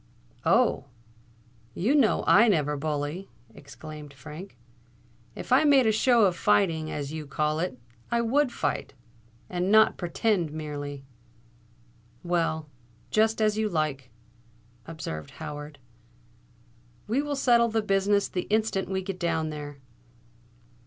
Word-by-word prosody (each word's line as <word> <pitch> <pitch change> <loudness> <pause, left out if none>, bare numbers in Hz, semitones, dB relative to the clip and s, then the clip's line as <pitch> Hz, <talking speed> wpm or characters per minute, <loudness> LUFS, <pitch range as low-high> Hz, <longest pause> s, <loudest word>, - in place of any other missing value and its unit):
"Oh! - - +3 0.9
you 220 +11 +1
know 275 -7 +3
I 230 +4 +6
never 150 -8 +2
bully," 150 +5 -3 0.2
exclaimed 150 0 -11
Frank. 150 +4 -10 0.8
"If - - -8
I 260 +4 +6
made 280 -4 +5
a 220 - +4
show 230 0 +4
of 180 -3 +1
fighting, 160 -1 +2
as 145 0 -4
you 155 -2 -6
call 150 +2 -1
it, 170 -7 -3 0.3
I 235 - +1
would 260 +3 +2
fight—and 120 - -5
not 220 0 +5
pretend 175 -1 0
merely." 145 -2 -6 1.2
"Well—just 160 - -1
as 215 0 +1
you 215 -1 +1
like," 150 -7 -2 0.8
observed 110 - -6
Howard. 150 -1 -7 1.3
"We 240 +6 +1
will 290 0 -3
settle 235 -3 +3
the 220 -1 0
business 200 0 +2
the 180 - -4
instant 215 -3 0
we 190 -1 -2
get 190 -1 -5
down 160 -3 -1
there." 145 -1 -7
170 Hz, 120 wpm, -27 LUFS, 150-215 Hz, 1.3 s, I